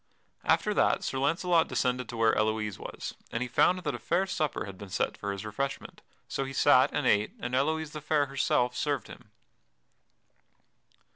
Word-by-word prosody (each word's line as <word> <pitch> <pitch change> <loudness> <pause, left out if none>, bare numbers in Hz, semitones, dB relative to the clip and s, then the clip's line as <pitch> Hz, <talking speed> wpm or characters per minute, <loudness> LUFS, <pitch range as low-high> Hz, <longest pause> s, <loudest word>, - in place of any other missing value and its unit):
After - - +2
that - - +2
Sir 135 - -2
Launcelot 165 +3 +2
descended 125 -1 -1
to 120 - -6
where 115 -1 +3
Elouise 110 -2 0
was, - - -6 0.2
and 115 - -1
he - - -4
found 180 +9 +3
that 145 - -1
a 120 - -5
fair 170 - +1
supper 155 -6 -2
had 100 -1 -8
been 100 +1 -10
set - - -1
for 100 - -4
his 100 +1 -6
refreshment. 135 +6 -4 0.3
So 135 - -2
he 135 0 -6
sat - - +5
and - - -1
ate, 105 +1 +2
and 120 - -4
Elouise 155 +3 0
the 150 - -7
Fair 150 0 +2
herself 135 -2 +1
served 145 -6 -1
him. - - -13
130 Hz, 185 wpm, -29 LUFS, 110-150 Hz, 0.3 s, sat